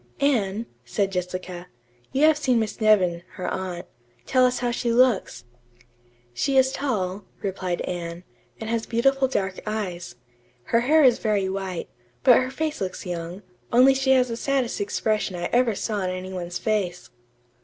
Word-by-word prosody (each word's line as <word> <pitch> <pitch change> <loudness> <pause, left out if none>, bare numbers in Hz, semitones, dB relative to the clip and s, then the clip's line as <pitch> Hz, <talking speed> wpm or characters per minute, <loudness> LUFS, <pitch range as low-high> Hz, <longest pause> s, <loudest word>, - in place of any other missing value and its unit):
"Anne," 225 -6 +1 0.2
said 195 +11 -1
Jessica, 180 -1 -4 0.4
"you 275 - +1
have 315 0 +6
seen 265 -5 +1
Miss 220 +1 -3
Nevin, 185 -6 +4
her 185 -1 -5
aunt. 185 -2 -4 0.4
Tell 255 -1 +4
us 250 - -1
how 245 -1 -1
she 235 0 -1
looks." 235 - +2 0.9
"She 270 - 0
is 265 0 +5
tall," 205 -9 -2 0.2
replied 185 -3 -2
Anne, 170 0 -5 0.4
"and 220 - -5
has 230 0 -1
beautiful 270 +3 +2
dark 190 -7 -2
eyes. 185 -5 -4 0.5
Her 230 - +2
hair 300 +6 +4
is 250 -3 +5
very 205 -3 +1
white, 190 -2 -4 0.4
but 250 -3 +7
her 255 0 0
face 305 +1 -3
looks 190 0 -4
young, 175 +2 -5 0.3
only 255 +3 +6
she 265 0 -1
has 255 -1 +3
the 230 - -3
saddest 265 -4 -1
expression 210 -1 -1
I 175 0 -3
ever 240 -3 +3
saw 215 +1 -2
on 185 -2 -1
any 185 +1 -5
one's 175 -1 -4
face." 200 -5 -2
210 Hz, 165 wpm, -24 LUFS, 185-255 Hz, 0.9 s, but